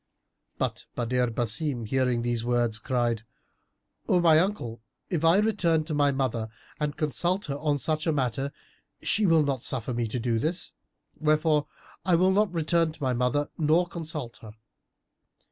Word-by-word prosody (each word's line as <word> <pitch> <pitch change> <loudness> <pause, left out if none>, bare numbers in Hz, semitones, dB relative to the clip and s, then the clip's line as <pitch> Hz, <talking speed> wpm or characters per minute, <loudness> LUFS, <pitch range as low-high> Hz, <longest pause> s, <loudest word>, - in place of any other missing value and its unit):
But - - -2
Badr 125 +1 +1
Basim, 120 +2 -1
hearing 125 0 +1
these 120 -1 0
words, 120 -2 +1
cried, 120 -2 0 0.9
"O 180 - +4
my 165 -2 +6
uncle, 140 - -2 0.3
if 165 -3 -1
I 165 +3 +5
return 185 -7 +2
to 155 0 -5
my 145 -1 +3
mother 125 -5 -1 0.3
and 150 -1 -2
consult 175 +5 0
her 140 - -3
on 150 -1 +1
such 155 +3 -1
matter, 135 -2 0 0.5
she 210 -1 +2
will 165 -2 +5
not 135 -4 -1
suffer 125 -1 -2
me 120 -1 -1
to 115 +3 -3
do 115 -1 0
this; 170 +7 -2 0.5
wherefore 155 -1 +2 0.4
I 180 -1 +3
will 185 +3 +4
not 205 0 +2
return 165 0 +1
to 155 - -10
my 130 -1 +1
mother 125 +4 0
nor 160 +3 +3
consult 160 -8 -5
her." 110 -2 -12
145 Hz, 160 wpm, -27 LUFS, 120-165 Hz, 0.9 s, my